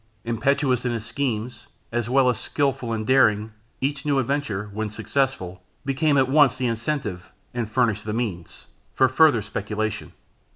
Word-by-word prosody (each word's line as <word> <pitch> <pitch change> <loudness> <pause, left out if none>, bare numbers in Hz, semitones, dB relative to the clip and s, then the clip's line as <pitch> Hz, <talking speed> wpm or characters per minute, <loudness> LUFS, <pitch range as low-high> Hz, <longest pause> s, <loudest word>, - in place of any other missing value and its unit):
Impetuous 125 +2 +1
in 125 -1 -1
his 115 -2 -4
schemes, 120 -1 -3 0.2
as 120 -1 -1
well 130 0 +4
as 125 - +1
skilful 135 -4 -1
and 110 -1 -2
daring, 110 -4 +3 0.3
each 140 +2 -1
new 145 -2 +1
adventure, 130 -6 -1
when 110 +1 -2
successful, 105 -6 -2 0.2
became 140 +2 +2
at 135 -1 +4
once 135 -2 +4
the 130 - -1
incentive, 115 -5 -3 0.2
and 120 -3 -2
furnished 110 -4 +1
the 110 - -2
means, 105 -7 -4 0.3
for 130 - +5
farther 130 -4 +4
speculation. 105 +1 -3
120 Hz, 155 wpm, -24 LUFS, 110-135 Hz, 0.3 s, for